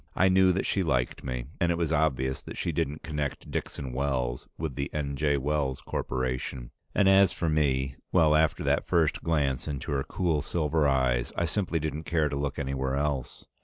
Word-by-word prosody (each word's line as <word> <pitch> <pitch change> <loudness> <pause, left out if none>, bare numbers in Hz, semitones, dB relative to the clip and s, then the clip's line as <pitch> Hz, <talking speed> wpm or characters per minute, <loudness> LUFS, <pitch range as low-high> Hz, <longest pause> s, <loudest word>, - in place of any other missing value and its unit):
I 95 +1 +4
knew 95 0 +5
that 95 - -1
she 100 - +1
liked 65 -8 0
me, 65 -2 -3
and 85 -2 +2
it 85 - 0
was 85 -2 0
obvious 65 -4 +1
that - - -9
she - - -1
didn't 75 +3 -2
connect 75 -2 -4
Dixon 65 -3 -4
Wells 65 -2 -1
with 80 -3 -3
the 70 +2 -3
N. 70 -2 -2
J. 75 0 +2
Wells 70 -1 -1
Corporation. 65 -1 -3 0.2
And 100 - +4
as 95 -1 +6
for 85 - -2
me 65 -3 +1
well, 80 -4 +5
after 80 0 +2
that - - +1
first 80 -3 +2
glance 75 -6 0
into 70 -2 -4
her 70 -1 0
cool 85 -3 0
silver 80 -1 +1
eyes, 65 -3 +1
I 85 - +1
simply 85 +1 -1
didn't 80 +1 -4
care 80 -3 +1
to 70 - -3
look 70 0 -2
anywhere 65 -1 -1
else. 70 -3 -2
75 Hz, 195 wpm, -28 LUFS, 65-80 Hz, 0.2 s, as